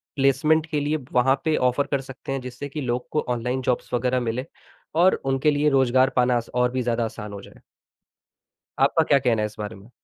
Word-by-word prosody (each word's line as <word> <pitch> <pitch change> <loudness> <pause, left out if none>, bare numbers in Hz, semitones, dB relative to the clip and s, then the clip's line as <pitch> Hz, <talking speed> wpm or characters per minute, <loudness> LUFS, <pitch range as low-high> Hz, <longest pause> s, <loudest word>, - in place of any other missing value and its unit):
Placement 145 +3 +3
के 150 - 0
लिए 150 +2 0
वहाँ 130 +2 +3
पे 160 -1 +2
ऑफ़र 125 +3 0
कर 140 -2 +1
सकते 135 0 -9
हैं 135 -1 -2
जिससे 125 +3 -7
कि 150 +2 -5
लोग 125 -1 -2
को 150 - +1
ऑनलाइन 125 +2 -1
जॉब्स 125 -1 -2
वगैरह 125 +1 +1
मिले 120 +2 -2 0.6
और 185 - +5 0.2
उनके 135 +3 +2
लिए 145 +1 +2
रोज़गार 130 -1 +3
पाना 125 -1 +3
स 115 - -10
और 125 0 +2
भी 130 - -1
ज़्यादा 120 -1 0
आसान 105 -2 -7
हो 100 - -7
जाए। - - -16 1.2
आपका - - +4
क्या 140 - +3
कहना 120 -4 +1
है - - +1
इस 105 0 -7
बारे 105 +1 -5
में? 100 +4 -16
130 Hz, 215 wpm, -24 LUFS, 120-140 Hz, 1.2 s, और